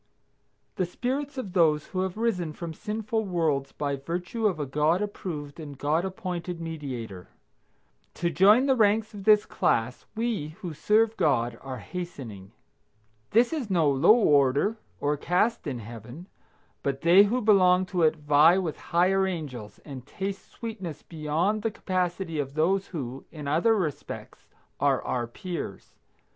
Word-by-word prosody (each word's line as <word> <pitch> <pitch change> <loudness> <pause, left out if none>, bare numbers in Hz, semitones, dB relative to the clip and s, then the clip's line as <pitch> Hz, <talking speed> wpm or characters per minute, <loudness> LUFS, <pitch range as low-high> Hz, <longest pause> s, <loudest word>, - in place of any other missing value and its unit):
The 185 -3 0
spirits 270 +8 -3
of 205 -8 -5
those 155 -4 +3
who 185 - -2
have 190 +1 -3
risen 185 -9 -1
from 165 +1 -6
sinful 220 +4 -2
worlds 160 -8 0
by 140 -1 -2
virtue 175 - -2
of 180 -6 -1
a 145 - -1
God 150 +6 +2
approved 170 -8 -5
and 145 -3 -8
God 150 +5 +1
appointed 180 -2 -4
Mediator. 130 - -6 0.9
To 170 -1 -1
join 205 - +6
the 270 -1 +3
ranks 215 -1 +2
of 200 -2 -9
this 210 -1 +6
class 115 +3 0
we, 215 -10 -2
who 175 -5 -5
serve 215 +7 +2
God, 120 -5 +1
are 130 -1 -6
hastening. 115 - -7 0.8
This 235 +6 +3
is 275 -9 -3
no 165 -6 +3
low 145 +11 +6
order 145 - +3 0.2
or 145 +1 0
caste 180 +6 0
in 135 -4 -3
Heaven, 120 - -9 0.6
but 135 -1 -2
they 180 +5 +7
who 235 +5 0
belong 185 -5 +4
to 180 -1 -2
it 160 -1 +4
vie 150 +3 +5
with 175 -6 -2
higher 190 +3 +2
angels, 140 - -6
and 135 -4 -8
taste 195 +2 -5
sweetness 195 -9 -7
beyond 165 +6 -1
the 225 - 0
capacity 180 -5 -2
of 140 0 -3
those 190 +5 +1
who, 135 -6 -6
in 150 -3 -7
other 170 +10 +3
respects, 165 -9 -5 0.3
are - - +2
our 120 -2 -2
peers. 175 +8 -6
170 Hz, 155 wpm, -27 LUFS, 145-200 Hz, 0.9 s, they